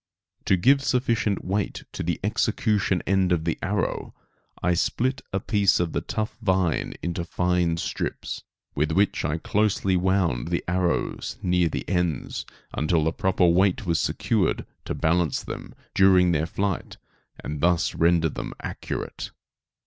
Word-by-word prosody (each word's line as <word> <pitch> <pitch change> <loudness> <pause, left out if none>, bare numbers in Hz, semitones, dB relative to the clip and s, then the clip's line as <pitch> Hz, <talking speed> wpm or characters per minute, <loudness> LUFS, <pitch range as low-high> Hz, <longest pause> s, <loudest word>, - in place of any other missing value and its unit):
To 95 - +4
give 135 +9 +4
sufficient 115 -6 +1
weight 100 +2 -2
to - - -5
the - - -1
execution 100 -4 +1
end 95 -2 +2
of 85 -3 +2
the 85 - -1
arrow, 100 -1 -2 0.5
I 90 +1 +3
split 125 +9 0
a 95 - 0
piece 100 -1 +2
of 85 -2 -1
the - - 0
tough 110 +1 -4
vine 95 -5 +1
into 85 0 -2
fine 90 -1 +1
strips, - - -3 0.3
with 75 +2 0
which 100 +3 +2
I 75 +2 0
closely 100 +1 +1
wound 90 -9 +1
the - - -1
arrows 90 0 -1
near 90 -2 +2
the - - -4
ends, 90 -6 -1 0.3
until 80 +1 +1
the 80 +1 +1
proper 95 0 +2
weight 90 +3 +3
was 85 -2 +1
secured - - 0 0.2
to - - -3
balance 85 0 +1
them - - -7 0.2
during 95 -2 +5
their 80 0 +1
flight 100 +1 -2 0.5
and 75 - -4
thus 85 0 +2
render 85 -1 +3
them - - -6
accurate. - - -5
90 Hz, 150 wpm, -25 LUFS, 85-100 Hz, 0.5 s, during